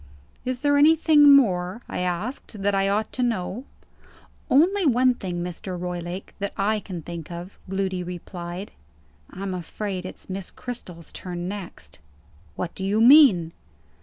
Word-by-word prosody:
"Is 255 +1 -3
there 285 0 +4
anything 300 -1 +6
more," 190 -4 +2
I - - -4
asked, 195 +4 -4
"that 200 0 +2
I 195 0 +2
ought 210 +2 -1
to 255 - -2
know?" 230 0 -2 0.8
"Only 365 +9 +4
one 255 -3 +4
thing, 180 -6 -4
Mr. 180 +1 -5
Roylake, 175 +1 -5
that 200 0 -3
I 210 +2 +1
can 180 -5 -7
think 170 -2 -7
of," 175 +3 -8
Gloody 190 -1 -1
replied. 175 +1 -7 0.6
"I'm 190 0 -5
afraid 185 +2 -4
it's - - -11
Miss 190 -1 -5
Cristel's 180 -10 -8
turn 175 -1 -5
next." 200 -2 -8 0.6
"What 175 - -4
do 190 - -6
you 200 +3 +1
mean?" 230 - +7
195 Hz, 145 wpm, -24 LUFS, 180-245 Hz, 0.8 s, mean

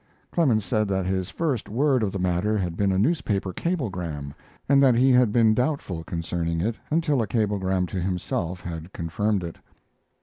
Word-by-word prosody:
Clemens 120 - +2
said 105 +3 +1
that 95 -1 -1
his 95 0 -1
first 140 -1 -2
word 130 +3 +2
of 105 -3 0
the 100 - -3
matter 90 +4 +1
had 90 -4 -2
been 100 +1 +1
a 95 - +1
newspaper 100 - 0
cablegram, 90 - -3 0.3
and 140 0 +5
that 130 -3 +5
he 130 +3 +4
had 125 -3 +5
been 110 -1 +4
doubtful 125 - -1
concerning 85 0 -2
it 110 +6 0
until 150 -4 +2
a 110 - -1
cablegram 95 -3 0
to 90 +1 -4
himself 90 -1 -2
had 85 +1 -7
confirmed 100 +4 -1
it. 85 -1 -6
100 Hz, 175 wpm, -25 LUFS, 90-120 Hz, 0.3 s, and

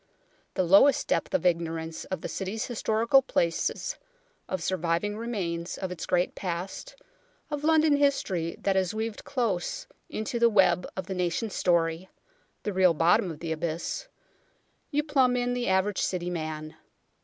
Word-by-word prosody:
The 185 - +2
lowest 195 +11 +5
depth - - 0
of 280 - 0
ignorance 165 -2 -1
of 185 -3 -4
the - - -4
City's 200 +3 -3
historical 230 +2 +3
places, 265 - -1 0.5
of 185 -3 -2
surviving 175 +3 0
remains 185 -7 -3
of 190 -1 -4
its 180 - -6
great 180 0 +1
past, 190 - -5 0.6
of 295 0 -3
London 315 -2 +4
history 190 - +1
that 195 - +1
is 190 +1 +1
weaved 220 0 -3
close 245 - -2 0.2
into 220 +2 -3
the 235 0 +5
web 190 -4 +3
of 190 - -3
the 190 - -4
nation's 180 +4 -1
story 170 0 +1 0.5
the 205 - -2
real 185 -3 +4
bottom 170 +3 +3
of 160 -2 -8
the 165 -1 -3
abyss 165 - -3 0.8
you 295 0 +1
plumb 265 -4 +3
in 245 0 0
the 245 0 -2
average 190 +1 +1
City 180 -1 -1
man. 155 -2 -5
190 Hz, 155 wpm, -28 LUFS, 170-235 Hz, 0.8 s, lowest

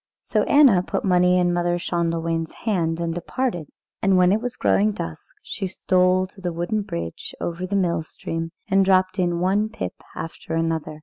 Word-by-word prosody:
So - - +1
Anna 270 -11 +6
put 180 - -3
money 180 -1 +4
into 175 -1 +2
Mother 175 0 +1
Schändelwein's 165 -2 -1
hand 170 -7 0
and 170 -1 -1
departed, 175 - -2 0.3
and 195 -1 +3
when 180 0 +5
it 210 +2 +2
was 245 0 -4
growing 210 +1 +2
dusk 80 - -7
she 190 - -4
stole 185 0 +2
to 190 +1 -16
the 175 -1 -2
wooden 175 +6 -1
bridge 85 - -6
over 175 +2 -3
the 200 - -2
mill 170 -4 +1
stream, 165 +1 -5 0.2
and 195 -2 +4
dropped 185 0 +2
in 175 -1 +1
one 200 +4 +1
pip 220 - -5 0.2
after 165 0 -5
another. 165 -2 -1
180 Hz, 180 wpm, -23 LUFS, 165-195 Hz, 0.3 s, Anna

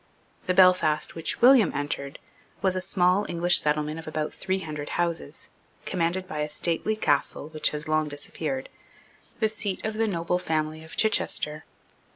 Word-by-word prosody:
The 180 - +1
Belfast 180 -5 +4
which 165 - -4
William 245 -6 +7
entered 140 0 -3 0.5
was 190 -1 +2
a 185 - -1
small 185 +1 +2
English 175 +1 +4
settlement 150 +1 0
of 160 - -10
about 155 0 -3
three 190 0 -2
hundred 150 -3 -6
houses, 170 - -3 0.4
commanded 180 +1 -1
by 155 -5 -5
a 150 0 -1
stately 170 +7 -1
castle 150 -5 0
which 155 -1 +1
has 150 0 -4
long 155 0 +1
disappeared, 145 -1 -5 0.7
the 220 - +3
seat 210 -3 -3
of 220 - -1
the 225 0 +2
noble 180 -2 -1
family 155 -2 -2
of 160 - -11
Chichester. 155 -8 +1
165 Hz, 160 wpm, -26 LUFS, 150-185 Hz, 0.7 s, William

